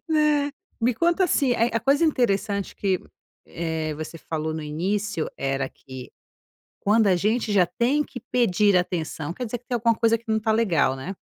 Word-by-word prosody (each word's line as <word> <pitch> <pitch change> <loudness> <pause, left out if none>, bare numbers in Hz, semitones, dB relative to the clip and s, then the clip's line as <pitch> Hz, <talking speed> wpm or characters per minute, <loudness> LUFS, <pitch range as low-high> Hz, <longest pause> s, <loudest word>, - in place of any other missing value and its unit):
Né. 300 -2 +2 0.3
Me 240 +2 +2
conta, 340 - +2
assim, 280 -6 +2
a 230 - +2
a - - 0
coisa 275 +7 +3
interessante 200 - 0
que, 190 -2 0 0.5
eh, 160 -2 -3
você 155 +2 -7
falou 160 0 -3
no 160 - -4
início 180 +4 -2
era 135 0 -1
que 130 -2 -11 0.7
quando 210 +1 +3
a 185 - +4
gente 215 +4 0
já 190 -3 +4
tem 260 - +1
que 260 -3 -9
pedir 210 -5 +3
atenção 165 -3 -2
quer 250 - -4
dizer 245 +1 -4
que 245 - -35
tem 250 - -3
alguma 230 -1 +2
coisa 230 0 +2
que 230 - -18
não 220 - +2
está 220 0 0
legal, 175 -12 +2
né. 160 +9 -6
210 Hz, 185 wpm, -24 LUFS, 165-240 Hz, 0.7 s, a